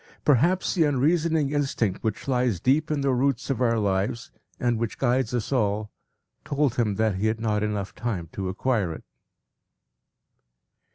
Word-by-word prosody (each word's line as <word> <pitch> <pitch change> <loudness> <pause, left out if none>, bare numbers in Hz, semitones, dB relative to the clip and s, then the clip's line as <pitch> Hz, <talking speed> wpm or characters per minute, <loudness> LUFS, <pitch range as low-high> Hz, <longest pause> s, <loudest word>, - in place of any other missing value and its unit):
Perhaps 165 +7 +3
the 170 - +3
unreasoning 150 +1 +2
instinct 135 -9 -1
which 110 +3 -3
lies 125 -7 +1
deep 140 - +2
in 150 -2 0
the 135 -1 +2
roots 135 +1 0
of 130 - -2
our 115 -2 +3
lives, 100 +3 -1 0.3
and 120 -2 +1
which 115 -2 -3
guides 125 -2 +1
us 120 0 -2
all, 105 -4 0 0.5
told 145 -3 0
him 115 -5 0
that 110 -2 +1
he 105 +3 0
had 110 0 -1
not 110 -2 0
time 105 0 0
enough 100 -3 -4
to 95 -2 -4
acquire 100 -3 0
it. - - -10
120 Hz, 160 wpm, -25 LUFS, 105-140 Hz, 0.5 s, Perhaps